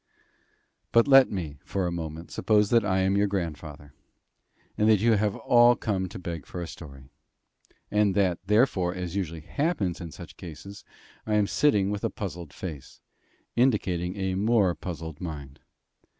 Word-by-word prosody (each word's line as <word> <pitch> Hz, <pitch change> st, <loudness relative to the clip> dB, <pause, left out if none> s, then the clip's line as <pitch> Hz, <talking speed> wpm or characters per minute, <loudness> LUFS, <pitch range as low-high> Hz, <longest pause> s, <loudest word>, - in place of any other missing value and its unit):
But 115 Hz, +2 st, +5 dB
let 135 Hz, -2 st, +7 dB
me, 80 Hz, -7 st, -5 dB
for 95 Hz, -2 st, -2 dB
a 90 Hz, -, -1 dB
moment, 80 Hz, -1 st, -6 dB
suppose 105 Hz, -2 st, +2 dB
that 115 Hz, -2 st, +5 dB
I 95 Hz, -2 st, +1 dB
am 95 Hz, +1 st, +2 dB
your 100 Hz, +1 st, +3 dB
grandfather, 75 Hz, -6 st, -5 dB, 0.8 s
and 105 Hz, +1 st, +2 dB
that 110 Hz, -2 st, +5 dB
you 115 Hz, +3 st, +3 dB
have 105 Hz, -2 st, +1 dB
all 120 Hz, 0 st, +5 dB
come 95 Hz, -6 st, -2 dB
to -, -, -8 dB
beg 85 Hz, -5 st, -6 dB
for 90 Hz, -, -7 dB
a 85 Hz, -, -3 dB
story; 70 Hz, -5 st, -11 dB, 0.8 s
and 105 Hz, -2 st, +2 dB
that, 95 Hz, -4 st, +2 dB
therefore, 100 Hz, -5 st, +2 dB
as 90 Hz, -1 st, -5 dB
usually 85 Hz, -5 st, -3 dB
happens 100 Hz, -, -1 dB
in 85 Hz, -, -6 dB
such -, -, -11 dB
cases, 90 Hz, +4 st, -10 dB, 0.4 s
I 105 Hz, -, +1 dB
am 105 Hz, -1 st, +3 dB
sitting 100 Hz, -5 st, +2 dB
with 105 Hz, -1 st, -4 dB
a -, -, +1 dB
puzzled 90 Hz, -6 st, -6 dB
face, 80 Hz, -8 st, -8 dB, 0.6 s
indicating 95 Hz, -8 st, +1 dB
a 95 Hz, -1 st, -1 dB
more 100 Hz, -1 st, +2 dB
puzzled 80 Hz, -4 st, -7 dB
mind. 75 Hz, -6 st, -7 dB
95 Hz, 165 wpm, -27 LUFS, 85-105 Hz, 0.8 s, let